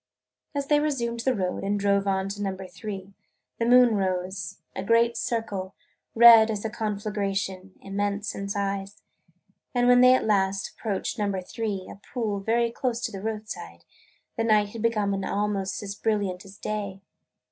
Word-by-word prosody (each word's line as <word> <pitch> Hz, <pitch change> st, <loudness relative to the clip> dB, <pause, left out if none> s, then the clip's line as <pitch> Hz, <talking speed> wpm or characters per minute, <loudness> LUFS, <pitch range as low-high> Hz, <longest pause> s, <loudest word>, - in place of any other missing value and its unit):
As 280 Hz, -1 st, -1 dB
they 295 Hz, +1 st, +3 dB
resumed 240 Hz, -6 st, -1 dB
the 255 Hz, +2 st, +1 dB
road 185 Hz, -2 st, -2 dB
and 200 Hz, +1 st, 0 dB
drove 200 Hz, 0 st, +2 dB
on 190 Hz, 0 st, +1 dB
to 205 Hz, +1 st, -5 dB
Number 190 Hz, -1 st, -3 dB
Three 195 Hz, +1 st, -7 dB, 0.5 s
the 230 Hz, -, +1 dB
moon 245 Hz, -1 st, +6 dB
rose 185 Hz, -2 st, -2 dB
– -, -, -43 dB
a 190 Hz, -, -3 dB
great 230 Hz, +3 st, +3 dB
circle, 225 Hz, -6 st, -3 dB, 0.4 s
red 230 Hz, -1 st, +9 dB
as 215 Hz, -1 st, -3 dB
a 220 Hz, -, -2 dB
conflagration, 200 Hz, -3 st, -3 dB
immense 205 Hz, +1 st, -2 dB
in 200 Hz, 0 st, -5 dB
size. 200 Hz, 0 st, -3 dB, 0.7 s
And 245 Hz, 0 st, +3 dB
when 245 Hz, 0 st, +7 dB
at 255 Hz, 0 st, +6 dB
last 195 Hz, -2 st, +1 dB
they -, -, -32 dB
approached 215 Hz, +2 st, -2 dB
Number 200 Hz, -2 st, 0 dB
Three, 200 Hz, 0 st, -4 dB
a -, -, -10 dB
pool 210 Hz, -1 st, -3 dB
very 230 Hz, +3 st, +1 dB
close 240 Hz, -1 st, -2 dB
to -, -, -2 dB
the 195 Hz, -, -7 dB
roadside, 215 Hz, 0 st, -6 dB, 0.5 s
the 230 Hz, -, +1 dB
night 210 Hz, -2 st, +3 dB
had 225 Hz, +1 st, -7 dB
become 210 Hz, -3 st, +1 dB
almost 200 Hz, 0 st, -1 dB
as 200 Hz, -1 st, -4 dB
brilliant 205 Hz, -4 st, -1 dB
as 195 Hz, +1 st, -13 dB
day. 205 Hz, -2 st, -4 dB
205 Hz, 170 wpm, -26 LUFS, 195-230 Hz, 0.7 s, red